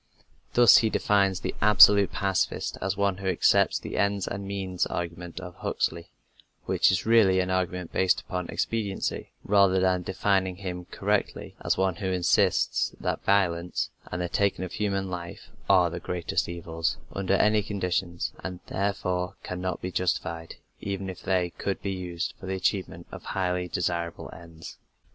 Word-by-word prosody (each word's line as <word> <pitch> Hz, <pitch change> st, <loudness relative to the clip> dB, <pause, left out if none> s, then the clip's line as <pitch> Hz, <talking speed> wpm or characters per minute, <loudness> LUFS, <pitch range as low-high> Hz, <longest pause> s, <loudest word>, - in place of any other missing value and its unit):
" -, -, -37 dB
Thus 120 Hz, -1 st, +8 dB
he 110 Hz, -, +3 dB
defines 100 Hz, -4 st, +2 dB
the -, -, -3 dB
absolute 100 Hz, -1 st, +7 dB
pacifist 95 Hz, -1 st, -1 dB
as 95 Hz, 0 st, -1 dB
one 100 Hz, -2 st, +1 dB
who 95 Hz, 0 st, -5 dB
accepts 90 Hz, -3 st, +3 dB
the -, -, -6 dB
ends 100 Hz, -1 st, +1 dB
and 100 Hz, 0 st, -5 dB
means 95 Hz, -2 st, -2 dB
argument 85 Hz, 0 st, -5 dB
of 90 Hz, -1 st, -8 dB
Huxley, 85 Hz, +1 st, -2 dB, 0.6 s
which -, -, +3 dB
is 95 Hz, +1 st, 0 dB
really 110 Hz, -5 st, +5 dB
an 90 Hz, 0 st, 0 dB
argument 90 Hz, -2 st, -2 dB
based 95 Hz, -1 st, +3 dB
upon 90 Hz, -2 st, -5 dB
expediency, 105 Hz, -4 st, -2 dB
rather 100 Hz, -2 st, +4 dB
than 90 Hz, -1 st, +2 dB
defining 95 Hz, 0 st, 0 dB
him 90 Hz, -2 st, -6 dB
correctly 100 Hz, +3 st, -2 dB
as -, -, +1 dB
one 95 Hz, -2 st, +1 dB
who 100 Hz, -, -3 dB
insists 90 Hz, -2 st, +2 dB
that -, -, -2 dB
violence 90 Hz, -3 st, +1 dB, 0.2 s
and 90 Hz, +2 st, -2 dB
the -, -, -1 dB
taking 100 Hz, 0 st, 0 dB
of 90 Hz, -, -8 dB
human 100 Hz, -2 st, -1 dB
life 90 Hz, -2 st, -7 dB, 0.2 s
are 90 Hz, -3 st, +5 dB
the 85 Hz, -, -5 dB
greatest 90 Hz, 0 st, -2 dB
evils, 85 Hz, -1 st, -3 dB, 0.2 s
under 95 Hz, 0 st, 0 dB
any 105 Hz, +2 st, +3 dB
conditions, 90 Hz, -4 st, -2 dB
and 90 Hz, -1 st, -5 dB
therefore 90 Hz, -2 st, -1 dB
cannot 90 Hz, 0 st, -4 dB
be 90 Hz, -, -3 dB
justified, 85 Hz, -2 st, -2 dB, 0.2 s
even 95 Hz, -1 st, -4 dB
if 90 Hz, -, -12 dB
they 90 Hz, -2 st, 0 dB
could 100 Hz, -, -2 dB
be 100 Hz, -, -1 dB
used 90 Hz, -2 st, -4 dB
for 95 Hz, -, -9 dB
the 95 Hz, -, -2 dB
achievement 95 Hz, +1 st, -2 dB
of -, -, -8 dB
highly 90 Hz, -1 st, -1 dB
desirable 85 Hz, -1 st, -3 dB
ends. 85 Hz, -1 st, -11 dB
95 Hz, 160 wpm, -27 LUFS, 90-100 Hz, 0.6 s, Thus